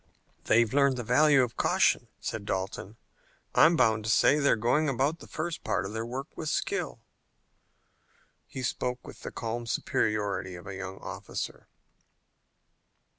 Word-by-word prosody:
"They've 115 0 +3
learned 140 -2 +3
the 120 - -3
value 135 +3 +5
of 120 -2 -3
caution," - - +2
said 110 - -4
Dalton. 95 +2 -4 0.6
"I'm 165 +2 +6
bound 110 -7 +3
to - - -1
say 145 +6 +5
they're 140 - +4
going 130 +7 +2
about 140 +5 0
the - - -12
first 160 +1 -4
part - - 0
of 100 - -6
their 110 +1 -3
work 135 +4 -6
with 155 - -4
skill." - - -2 1.5
He 130 - -6
spoke 125 0 -2
with - - -11
the - - -6
calm 115 0 -4
superiority 105 -5 -1
of 90 - -11
a 100 - -6
young 95 0 -6
Officer. - - -6
120 Hz, 150 wpm, -29 LUFS, 105-140 Hz, 1.5 s, I'm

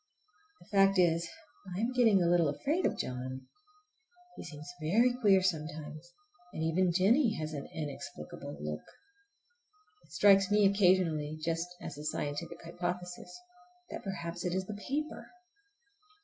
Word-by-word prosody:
The - - -18
fact 195 0 +5
is, 170 -1 +3 0.5
I - - -3
am 230 +3 0
getting 225 -7 +4
a - - +2
little 170 -3 +4
afraid 300 - 0
of - - -3
John. 130 +1 -4 0.9
He - - -8
seems 150 -1 -9
very 225 +11 +3
queer 205 -6 +4
sometimes, 155 -1 -3 0.4
and 160 - -3
even 175 +3 +2
Jennie 215 - +3
has 155 0 -4
an 140 -2 -5
inexplicable 145 - -7
look. 75 0 -4 1.2
It - - -24
strikes 195 +3 +5
me 210 0 +4
occasionally, 180 -6 +3
just 165 +2 -1 0.2
as 145 - -6
a - - -7
scientific 155 +3 -4
hypothesis, 180 +1 -5 0.6
that - - -6
perhaps 175 -3 -5
it 180 0 -1
is 190 0 -1
the 210 - -6
paper! 280 +9 -4
175 Hz, 140 wpm, -32 LUFS, 155-195 Hz, 1.2 s, fact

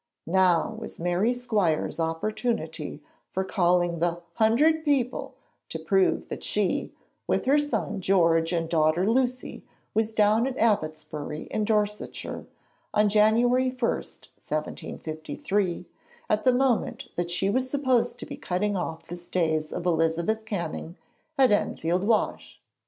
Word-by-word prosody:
Now 185 +3 +2
was - - -8
Mary 175 +7 +1
Squires' 210 -12 0
opportunity 165 -3 -2 0.3
for 190 - -1
calling 175 -2 +1
the 170 0 0
'hundred 285 - +3
people' 270 -5 0 0.3
to - - -4
prove 380 -2 +1
that - - -6
she, - - 0 0.4
with - - 0
her 280 +3 +4
son 220 -8 -2
George 165 -3 +3
and 165 -2 0
daughter 160 +3 +2
Lucy, 250 +2 0 0.3
was 220 0 +1
down 220 +2 +3
at 265 -1 -4
Abbotsbury 155 -8 -1
in 215 - 0
Dorsetshire, 210 -1 -2 0.5
on 210 0 +4
January 235 +5 +4
1, 255 - -9
1753, 165 +4 -4 0.5
at 210 +3 +1
the 255 - +6
moment 250 0 0
that 175 0 -2
she 190 +3 0
was 255 +3 0
supposed 260 -4 +1
to - - -7
be - - -8
cutting 200 +3 -1
off 165 -3 -3
the 175 - -6
stays 160 -3 -1
of 175 - -4
Elizabeth 170 +6 +1
Canning 170 -4 -4 0.4
at 265 -3 +5
Enfield 180 -2 +1
Wash! 225 -2 0
205 Hz, 130 wpm, -26 LUFS, 170-235 Hz, 0.5 s, the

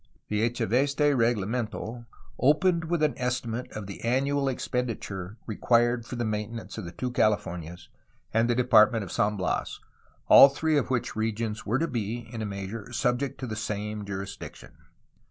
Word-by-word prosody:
The 105 0 0
Echeveste 140 +5 +1
reglamento 115 0 -1 0.3
opened 170 +5 +3
with 165 -1 0
an 150 - +3
estimate 125 -1 -2
of 105 -1 -5
the 100 - -8
annual 135 +3 +1
expenditure 115 -6 -3
required 120 +2 +2
for - - -5
the 120 -1 -2
maintenance 110 +1 -4
of 105 - -6
the 85 - -7
two 125 +8 -4
Cahfornias 90 -7 -1 0.5
and 115 +2 +3
the 120 - +3
Department 115 -2 +5
of 95 - -8
San 105 0 +1
Bias, 95 - -2 0.5
all 140 - +10
three 155 +3 0
of 145 - +1
which 125 -2 -1
regions 110 0 -2
were 115 +4 +2
to 165 +4 0
be 120 -3 -3
in 115 - -4
a 110 - -2
measure 100 +3 -6
subject 125 +2 -1
to - - -2
the 110 -3 -4
same 105 0 -3
jurisdiction. 100 -1 -7
115 Hz, 160 wpm, -27 LUFS, 105-125 Hz, 0.5 s, all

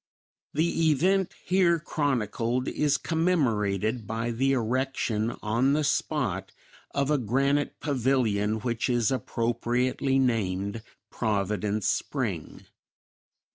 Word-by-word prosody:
The 165 +1 +2
event 185 +6 +2
here 180 -2 +3
chronicled 125 -5 -1
is 145 -1 +1
commemorated 115 - 0
by 115 +2 -2
the 135 +4 +1
erection 120 -2 -1
on 120 +6 +2
the 155 +1 +1
spot - - -1 0.4
of 140 +1 +1
a 150 - +3
granite 135 +5 0
pavilion 115 -7 +1
which 120 +1 -1
is 120 -1 +2
appropriately 125 +2 0
named 105 -4 0 0.3
"Providence 105 -1 -1
Spring." - - -2
125 Hz, 95 wpm, -27 LUFS, 110-140 Hz, 0.4 s, here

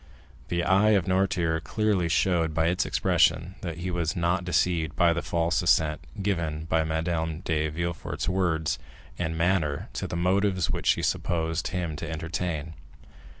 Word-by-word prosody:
The 85 0 -1
eye 100 +4 +4
of 90 - -1
Noirtier 90 -3 +1
clearly 105 -6 0
showed 80 -1 +1
by 80 +1 +3
its 90 +1 0
expression 85 -1 +2
that 85 -4 -5
he 90 +2 -3
was 85 +1 -1
not 85 +1 +1
deceived 85 -3 0
by 85 -2 +4
the 85 - -2
false 85 -1 0
assent 75 -1 +2 0.2
given 85 -6 -1
by 80 -1 +1
Madame 80 0 -2
de 80 -2 0
Villefort's 85 +2 -4
words 85 -4 0 0.4
and 80 +1 -2
manner 80 -4 0
to - - -3
the - - -5
motives 95 -1 +1
which - - -3
she - - +3
supposed 80 -1 -1
him 90 -4 -3
to - - -5
entertain. 80 -1 -3
85 Hz, 155 wpm, -27 LUFS, 80-90 Hz, 0.4 s, eye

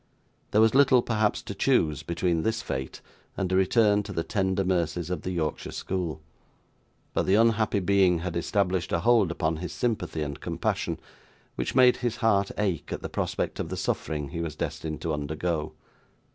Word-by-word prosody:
There 105 - +3
was 110 0 +5
little, 135 -2 +5
perhaps, 110 -2 0
to - - -6
choose 90 - +2
between 85 -1 0
this 110 +5 -1
fate 65 0 -4 0.4
and 95 -2 -1
a - - +2
return 105 +2 +4
to 105 - -8
the 85 -4 -2
tender 95 +2 0
mercies 85 -2 -1
of 90 -4 -2
the - - -4
Yorkshire 80 -4 -2
school; 85 -5 -3 0.9
but - - 0
the 95 - +4
unhappy 110 -2 +3
being 95 -2 +3
had 85 +1 -4
established 90 +1 0
a 85 - +1
hold 115 -3 +4
upon 80 -1 -1
his 90 +2 -5
sympathy 110 -10 -1
and 70 -2 -6
compassion, - - -2 0.5
which - - -3
made 125 -1 +6
his 120 -2 -2
heart 100 -4 +2
ache 95 -6 -1
at - - -4
the - - -4
prospect - - -2
of - - -3
the - - -4
suffering 75 -3 -2
he 85 - -5
was 80 -3 -4
destined 80 -1 -4
to 85 -2 -1
undergo. 75 +1 -2
95 Hz, 180 wpm, -27 LUFS, 80-105 Hz, 0.9 s, made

